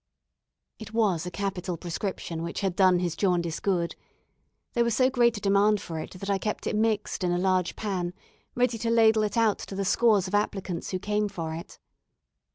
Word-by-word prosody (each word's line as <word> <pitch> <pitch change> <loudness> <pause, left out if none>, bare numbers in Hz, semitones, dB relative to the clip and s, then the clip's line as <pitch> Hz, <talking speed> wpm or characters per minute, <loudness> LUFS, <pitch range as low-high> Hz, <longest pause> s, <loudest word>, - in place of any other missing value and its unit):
It 220 0 -9
was 185 -7 +1
a - - -2
capital 185 -2 -3
prescription 170 -1 -4
which 170 - -4
had 190 -3 -1
done 185 -2 +5
his 175 -2 -1
jaundice 175 -4 0
good. 175 -4 0 0.8
There 235 - +3
was 235 -2 +1
so 255 +2 +3
great 240 -3 +3
a - - -7
demand 200 +1 +3
for 165 -3 -6
it, - - -7
that 195 - -6
I 200 -1 +1
kept 210 +2 -3
it - - -1
mixed 215 -2 0
in 180 - +1
a 175 - +1
large 185 -1 +1
pan, 180 -4 -3 0.4
ready 245 -2 +1
to 230 - -1
ladle 225 -1 +5
it 215 +2 -1
out 225 -3 +3
to 195 - -7
the 195 0 -2
scores 210 -2 +3
of 185 - -8
applicants 195 -4 -1
who 185 - -1
came 210 +2 -1
for 165 -5 -4
it. 170 +4 -8
195 Hz, 200 wpm, -27 LUFS, 180-215 Hz, 0.8 s, done